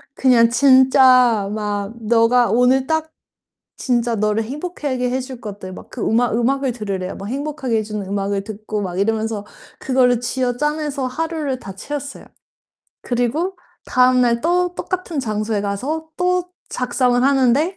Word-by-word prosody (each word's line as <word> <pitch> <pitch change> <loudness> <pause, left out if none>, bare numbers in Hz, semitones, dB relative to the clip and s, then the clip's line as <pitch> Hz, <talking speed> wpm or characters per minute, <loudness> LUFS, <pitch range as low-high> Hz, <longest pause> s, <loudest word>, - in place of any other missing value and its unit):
그냥 240 -3 +4
진짜 255 -4 +5
막 205 -1 -3
너가 230 +2 +3
오늘 255 +2 +3
딱 315 0 0 0.7
진짜 240 -2 0
너를 210 +1 0
행복하게 275 -2 -3
해줄 255 -1 -4
것들 200 -4 -8
막 - - -12
그 250 - -8
음악 230 0 +1
음악을 265 +3 +1
들으래요. 195 -5 -4
막 195 - -7
행복하게 270 -2 -2
해 - - 0
주는 210 -2 -5
음악을 200 0 -2
듣고 215 0 -5
막 180 -2 -4
이러면서 220 0 -1 0.3
그거를 250 -2 +2
쥐어짜내서 275 +3 -1
하루를 305 0 -3
다 195 -3 -9
채웠어요. 285 +7 -6 0.8
그리고 255 +10 -1 0.3
다음날 250 -2 +3
또 355 +3 +1
똑같은 360 -5 -3
장소에 215 -2 -2
가서 265 +11 -3
또 360 0 +1 0.2
작성을 250 0 +1
하는데 275 +6 +2
250 Hz, 300 characters per minute, -20 LUFS, 220-275 Hz, 0.8 s, 진짜